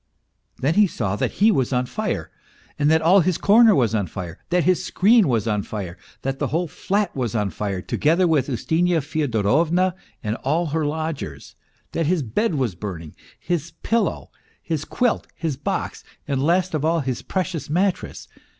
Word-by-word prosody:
Then 140 +5 +1
he 210 +2 +5
saw 105 - -2
that - - -1
he 215 +3 +4
was 130 - +1
on 125 -1 +1
fire, - - -3 0.5
that 155 +2 +3
all 180 +5 +6
his 180 -1 +1
corner 220 +2 +6
was 120 -6 +2
on 105 -4 0
fire, 85 0 -7
that 175 0 +2
his 185 0 +2
screen 215 +1 +4
was 115 -4 0
on 105 -2 +1
fire, 95 -4 -6 0.3
that 135 0 -2
the - - 0
whole 170 +3 -1
flat 200 +4 -1
was 120 -5 -2
on 105 -3 0
fire, 95 +1 -3
together 170 +5 +2
with 150 -4 +2
Ustinya 165 +6 +1
Fyodorovna 155 - +1 0.3
and 110 +1 -2
all 160 +6 0
her 155 -1 -1
lodgers, 150 - -5 0.4
that 165 -2 -1
his 170 -3 +1
bed 165 - 0
was 130 -8 0
burning, 85 -4 -7 0.2
his 170 -1 -3
pillow, 230 +1 0 0.3
his 155 -3 -3
quilt, 245 -2 0
his 160 -4 -2
box, 140 - -3 0.2
and 135 -2 0
last 175 +4 +2
of 155 -2 -1
all, 165 +1 +2
his 130 -2 -3
precious 185 -5 -3
mattress. 185 +4 -1
155 Hz, 175 wpm, -22 LUFS, 120-180 Hz, 0.5 s, all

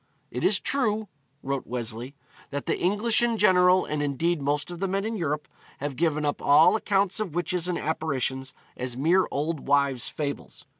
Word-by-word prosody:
'It - - -4
is - - +3
true,' 220 -6 0 0.4
wrote 135 -1 -3
Wesley, 120 +2 -4 0.3
'that 140 0 -4
the - - -1
English 210 +6 +2
in 235 -1 +1
general, 185 -2 +5
and 150 -1 -2
indeed 150 +3 0
most 145 +4 -1
of 175 - -7
the 195 - 0
men 195 +2 -1
in 225 +1 -2
Europe, 150 -6 -2 0.3
have 145 -1 -4
given 155 0 0
up 145 - -1
all 150 +7 +6
accounts 200 -2 +1
of 190 -7 -3
witches 175 0 -1
and 180 - -1
apparitions 135 -4 -2 0.2
as 125 -1 -5
mere 170 +7 +3
old 150 +1 -3
wives' 140 -3 +2
fables. 145 -2 -5
155 Hz, 180 wpm, -26 LUFS, 140-185 Hz, 0.4 s, all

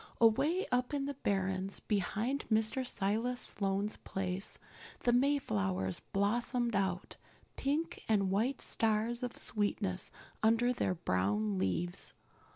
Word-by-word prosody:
Away 290 - +4
up 250 +3 +1
in 275 -1 -1
the 285 - -2
barrens, 190 -5 -1
behind 215 +6 -1
Mr. 220 +4 +2
Silas 225 +6 0
Sloane's 200 0 -1
place, 190 0 -1 0.4
the 240 - +3
Mayflowers 100 - +1
blossomed 235 +3 0
out, 190 -2 -1 0.4
pink 295 +4 -1
and 200 -3 +3
white 235 +7 +1
stars 225 +2 +1
of 245 -1 -4
sweetness 205 -3 -1 0.3
under 230 +3 +4
their 185 -6 0
brown 105 - 0
leaves. 170 - -1
210 Hz, 115 wpm, -34 LUFS, 185-245 Hz, 0.4 s, Away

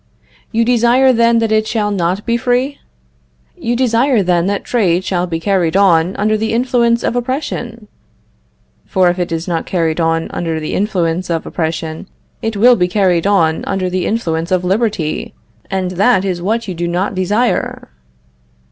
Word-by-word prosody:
You 230 0 +1
desire, 245 +2 +4
then, 235 0 +3
that 225 -1 0
it 215 0 +2
shall 210 -2 -1
not 185 +1 -1
be 235 - +1
free? 250 +3 0 0.8
You 235 +1 -2
desire, 240 -1 +2
then, 175 -1 +1
that 200 0 -1
trade 185 -7 +1
shall 180 -1 -1
be 165 -2 -3
carried 180 -1 +1
on 180 -2 +3
under 215 +1 +1
the 220 +1 -2
influence 235 -1 +1
of - - -1
oppression? 245 -3 -4 1.0
For 185 -3 +3
if 175 - -6
it 175 -1 -2
is 165 +1 -3
not 170 -2 -2
carried 165 -3 -1
on 165 0 0
under 165 -2 -3
the 155 - -4
influence 180 -3 -1
of 165 -1 -2
oppression, 160 +1 -4 0.3
it 225 -2 -3
will 245 +4 +6
be 180 -4 +1
carried 180 -2 +1
on 165 -6 +2
under 185 -2 -2
the 185 0 -1
influence 165 -7 -2
of 185 -1 +1
liberty, 190 -4 -1 0.3
and 190 -2 -2
that 195 +1 +2
is 180 -3 -2
what 220 +5 -1
you 185 - -3
do 175 0 -3
not 180 +4 -1
desire. 205 - -1
195 Hz, 170 wpm, -16 LUFS, 175-230 Hz, 1.0 s, will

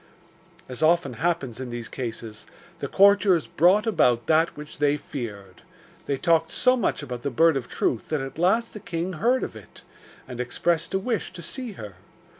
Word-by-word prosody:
As 125 -1 -7
often 160 -4 +3
happens 160 -9 -1
in 130 -1 -5
these 120 -1 -6
cases, 115 -3 -7 0.3
the - - -3
courtiers 195 -4 +4
brought 185 +7 +3
about 125 - +2
that 160 +3 +2
which 150 -1 -9
they 145 0 +2
feared. 105 - -8 0.5
They 140 - 0
talked 165 +1 +2
so 255 0 +3
much 225 - -1
about 125 -3 -6
the 140 - -2
Bird 160 +5 +4
of 130 -2 -3
Truth 115 - -1
that 155 - 0
at 135 +3 -6
last 210 +7 +2
the 210 - -7
king 175 0 -4
heard 240 +9 +1
of - - -5
it, - - -13 0.4
and 125 -2 -8
expressed 165 +7 -1
a - - +2
wish 225 +2 -2
to 170 - -8
see 250 - -6
her. 105 - -10
155 Hz, 185 wpm, -25 LUFS, 125-185 Hz, 0.5 s, courtiers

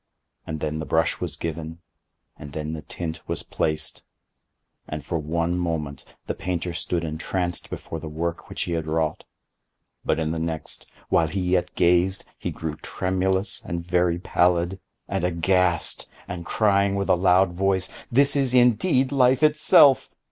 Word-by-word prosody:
And 80 -2 -4
then 75 0 -2
the 80 - -4
brush 80 +1 +1
was 85 -5 -3
given, 80 +1 -5 0.6
and 75 -1 -10
then 75 0 -4
the 80 - -5
tint 80 +1 -6
was - - -3
placed; 75 0 -1 0.9
and, 75 -2 -6
for 85 - -2
one 85 +3 -1
moment, 80 -5 -3 0.2
the - - -2
painter 90 -1 -3
stood 85 0 -2
entranced 85 +2 -3
before 80 - -6
the 80 - -7
work 85 +2 -4
which - - -3
he - - -4
had 80 -2 -2
wrought; 80 -1 -1 0.8
but - - +1
in 80 -1 -1
the 80 - -2
next, 80 -1 -4 0.2
while 80 0 +3
he 95 +5 -2
yet 90 -1 0
gazed, 90 +3 +3
he - - -3
grew 80 -2 -5
tremulous 95 +2 -1
and 85 -6 -4
very 90 -1 +2
pallid, 90 +1 +1 0.3
and - - -2
aghast, 90 0 +2 0.2
and 85 -2 -6
crying 100 -2 +2
with 100 0 -1
a 95 - +5
loud 90 +1 +4
voice, 95 0 +1 0.2
'This 140 +4 +5
is 135 -3 +2
indeed 125 - +4
Life 130 +1 +3
itself! 150 -3 +6
85 Hz, 160 wpm, -24 LUFS, 80-95 Hz, 0.9 s, itself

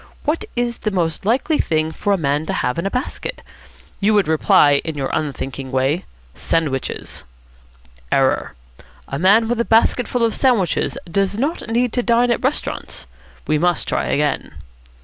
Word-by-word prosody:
What 330 +8 -1
is 240 -1 -1
the 215 - -1
most 175 -4 -1
likely 270 +7 +2
thing 155 0 0
for 205 - -2
a 200 - +3
man 150 -1 -1
to - - -1
have 125 +6 -1
in 180 - -1
a - - 0
basket? 255 - -4 0.6
You 210 +1 +3
would 205 -5 +3
reply, 150 -2 +4
in 160 -2 -5
your 135 -1 -2
unthinking 135 -3 -3
way, 135 +7 0 0.3
'sandwiches.' 145 - -2 0.9
Error. 130 - +1 0.5
A 140 - -4
man 200 +6 +5
with 235 0 0
a - - +2
basketful 235 +1 +2
of 230 - +2
sandwiches 230 - +1
does 195 +3 -1
not 280 -1 -2
need 240 +1 +1
to 245 - +1
dine 240 0 +3
at 235 - -1
restaurants. 270 +4 -3 0.4
We 155 0 +1
must 175 0 +1
try - - 0
again." 145 -1 -1
190 Hz, 165 wpm, -20 LUFS, 150-235 Hz, 0.9 s, man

